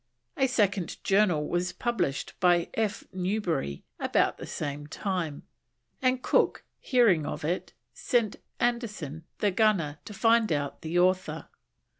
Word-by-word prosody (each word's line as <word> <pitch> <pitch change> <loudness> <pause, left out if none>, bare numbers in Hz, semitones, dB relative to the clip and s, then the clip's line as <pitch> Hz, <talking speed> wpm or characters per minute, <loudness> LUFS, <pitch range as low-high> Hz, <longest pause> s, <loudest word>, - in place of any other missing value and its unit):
A 265 - +3
second 200 -8 0
Journal 185 -7 +3
was 175 0 -1
published 180 - -1
by 175 -2 +3
F. 220 -3 -1
Newbery 180 - -1 0.2
about - - +1
the - - -7
same 145 -1 -4
time, 170 -4 -3 0.6
and 255 0 +2
Cook - - +2 0.2
hearing 215 - +3
of - - -4
it, 180 +3 -2 0.2
sent 230 - 0 0.2
Anderson, 210 - -2
the 205 - +2
gunner, 180 -8 +2
to 210 - -8
find 225 -1 +3
out 145 -2 -2
the 160 +2 -2
author. 185 +1 +1
185 Hz, 130 wpm, -28 LUFS, 160-220 Hz, 0.6 s, A